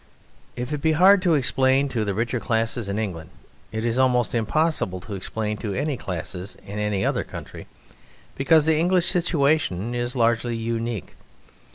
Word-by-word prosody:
If 125 +4 -4
it 145 - -3
be 160 +1 +2
hard 190 +4 +6
to 175 -4 +3
explain 135 0 +2
to 120 -4 -1
the 100 -2 -2
richer 120 +3 -1
classes 115 -2 -1
in 100 - -2
England, 90 -7 -4 0.4
it 110 +1 -3
is 120 +2 0
almost 125 -3 +2
impossible 120 - 0
to 105 - -8
explain 105 +2 -3
to 105 -3 -4
any 145 +1 -1
classes 90 -1 -5
in 100 +1 -6
any 105 -2 0
other - - 0
country, - - -9 0.7
because 150 +3 +3
the 160 -1 +3
English 175 +1 +3
situation 145 - +1
is 120 +1 -2
largely 115 0 +1
unique. 115 -2 -3
120 Hz, 165 wpm, -24 LUFS, 105-145 Hz, 0.7 s, hard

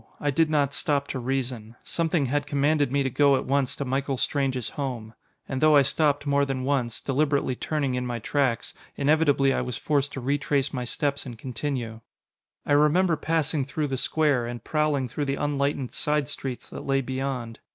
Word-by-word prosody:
I 145 - 0
did 160 +3 +2
not 145 -2 +1
stop 140 -2 0
to 130 - -3
reason. 125 -3 -3
Something 165 -3 0
had 145 +2 -1
commanded 145 -1 +2
me 140 0 +2
to 135 - 0
go 140 +1 +4
at - - -2
once 135 -1 +1
to 140 - -4
Michael 135 +1 -1
Strange's 130 -4 -1
home. 125 -6 -5 0.3
And 135 -1 -3
though 155 -1 +6
I 140 - +7
stopped 145 +1 +1
more 140 0 +3
than 135 -2 -2
once, 130 -4 -1
deliberately 140 -1 +1
turning 140 -1 -1
in 125 0 -1
my 120 -1 -3
tracks, 125 0 0 0.2
inevitably 145 -2 +3
I - - 0
was 125 -2 -4
forced 145 -2 0
to - - -4
retrace 140 +1 0
my 125 -2 -2
steps 140 +3 -2
and 120 -2 -8
continue. 125 -2 -4 0.6
I - - -3
remember 160 +4 +4
passing 160 -1 0
through 140 +2 -2
the 135 - -1
square, 140 -4 +1
and 120 -1 -6
prowling 150 -4 0
through 145 +5 -3
the 135 0 -1
unlightened 140 -2 -1
side 150 -2 0
streets 130 -1 -5
that - - -6
lay 135 0 +2
beyond. 130 -3 -4
140 Hz, 190 wpm, -26 LUFS, 130-145 Hz, 0.6 s, I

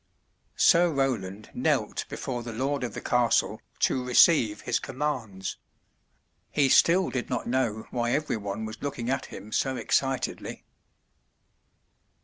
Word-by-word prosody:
Sir 175 0 +5
Roland 110 -8 -2
knelt - - 0
before 125 -2 -4
the 120 0 -6
lord 135 +3 -1
of 120 - -4
the - - -5
castle 120 -1 +1 0.2
to 130 - +2
receive 125 -3 +4
his 120 - 0
commands. 125 -9 -4 0.9
He 140 -2 +2
still 180 +7 +4
did 125 -2 -3
not 125 -3 -2
know 120 -4 -1
why 120 -1 -1
every 150 -5 0
one 100 +1 -4
was 110 +1 -8
looking 130 -4 -3
at 135 - -2
him 105 - -10
so 130 +3 0
excitedly. 135 -1 -1
125 Hz, 130 wpm, -27 LUFS, 110-135 Hz, 0.9 s, Sir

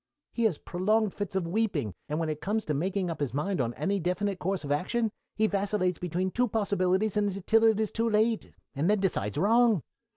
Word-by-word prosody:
He 235 - 0
has 190 -9 +2
prolonged 210 +3 0
fits 205 -2 -5
of 190 -3 0
weeping, 170 - -1 0.2
and 150 +2 -1
when 165 - -1
it 155 -1 -3
comes 215 +2 -1
to 150 - -1
making 180 +4 -1
up 165 - -6
his 140 -3 -2
mind 180 +2 0
on 120 -1 -2
any 195 +8 0
definite 185 +2 -1
course 190 0 -2
of 145 - -4
action 215 +9 0 0.2
he 220 - +2
vacillates 200 -3 0
between 180 +2 -2
two 245 +4 +1
possibilities 200 -1 +1
until 205 +2 +2
it 220 -1 +4
is 215 -2 0
too 230 0 0
late, 220 +1 +1 0.2
and 150 +7 0
then 210 0 +3
decides 105 - 0
wrong. 225 - +4
195 Hz, 205 wpm, -28 LUFS, 170-215 Hz, 0.2 s, it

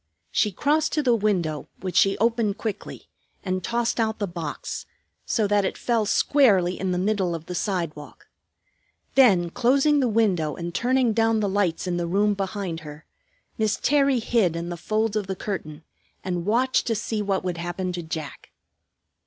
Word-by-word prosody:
She 210 - +2
crossed 300 - +1
to 300 - +1
the 245 -3 +3
window, 185 -9 0
which 185 -1 -4
she 195 0 +4
opened 225 -2 +1
quickly, 210 -3 -6 0.4
and 185 -1 -2
tossed 235 +2 -1
out 220 -1 0
the 205 - -1
box, 170 -5 -6 0.4
so 220 - +1
that 205 0 +2
it 190 - -2
fell 230 -3 0
squarely 200 -10 +3
in 190 -1 -1
the 180 - 0
middle 190 -2 0
of 165 -1 -8
the 180 - -6
sidewalk. 170 - -4 0.9
Then 190 -10 +5
closing 280 - +3
the 260 - +2
window 190 -9 +1
and 170 0 -5
turning 250 0 +2
down 225 0 +2
the 210 - 0
lights 190 -4 0
in 180 -1 -1
the 170 -1 -2
room 205 +4 +2
behind 195 -3 -3
her, 150 -1 -11 0.5
Miss 215 -1 +1
Terry 275 -2 +3
hid 220 -7 +1
in 170 +1 -4
the 175 - -4
folds 215 +5 -1
of 210 -3 -1
the 190 - -3
curtain 165 -6 -5 0.4
and 180 -1 -3
watched 250 +5 +2
to 225 - +1
see 215 0 -2
what 195 -2 -1
would 180 -2 -3
happen 175 +2 -3
to 175 - -4
Jack. 160 -3 -7
200 Hz, 180 wpm, -24 LUFS, 175-225 Hz, 0.9 s, Then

